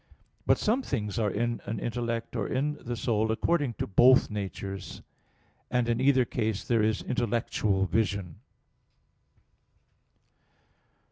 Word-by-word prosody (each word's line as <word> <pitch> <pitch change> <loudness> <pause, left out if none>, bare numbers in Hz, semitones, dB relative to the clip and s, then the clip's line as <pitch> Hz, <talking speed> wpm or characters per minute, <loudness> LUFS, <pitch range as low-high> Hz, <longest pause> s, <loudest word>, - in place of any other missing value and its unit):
But - - +5
some 230 +6 +1
things 110 - -3
are 105 -2 +2
in 120 +4 -1
an 110 +2 -3
intellect 115 +1 -3
or 110 -4 -1
in 145 +3 -1
the 120 0 -3
soul 110 -1 0
according 140 +1 0
to - - -2
both 125 +7 +5
natures; 100 -1 -6 0.7
and 125 -1 +1
in 120 +1 0
either 130 -2 +4
case 110 -4 -2
there 115 -2 +2
is 110 0 +1
intellectual 110 -4 0
vision. 100 -3 -1
115 Hz, 125 wpm, -28 LUFS, 105-125 Hz, 0.7 s, But